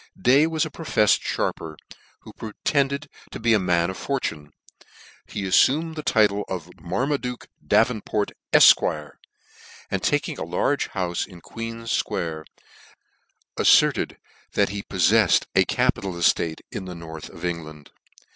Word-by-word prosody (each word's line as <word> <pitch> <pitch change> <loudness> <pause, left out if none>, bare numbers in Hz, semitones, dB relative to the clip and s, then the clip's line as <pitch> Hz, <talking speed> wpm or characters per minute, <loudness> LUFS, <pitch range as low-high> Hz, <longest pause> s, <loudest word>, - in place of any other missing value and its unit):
Day 135 +9 +4
was 160 0 0
a 155 - -7
profeffed 135 -10 +2
fharper, 80 -2 -3 0.5
who - - -13
pretended 140 +6 -1 0.2
to - - -8
be 115 0 +2
a 110 - +4
man 90 -1 +1
of 95 - -9
fortune. 80 - -3 0.8
He 100 - -5
aifumed 150 - +3
the 155 - -5
title 105 -6 +2
of 90 -2 -5
Marmaduke 125 +5 -3
Davenport, 110 -2 +1 0.2
Efq. 75 -2 +5 0.8
and - - -1
taking - - -1
a - - -3
large - - -1
houfe 90 -2 -2
in 90 -3 -13
Queen's 115 +4 -7
Square, 80 -2 -2 1.1
afierted - - +4 0.4
that 100 - +2
he 100 +1 -4
poffcir 95 +2 +3
ed - - -19
a - - +3
capital 95 -1 0
eftarein 85 -1 +1 0.3
the 90 - -7
north 80 -2 -9
of 85 - -8
England. 80 -4 -6
100 Hz, 135 wpm, -24 LUFS, 85-125 Hz, 1.1 s, Efq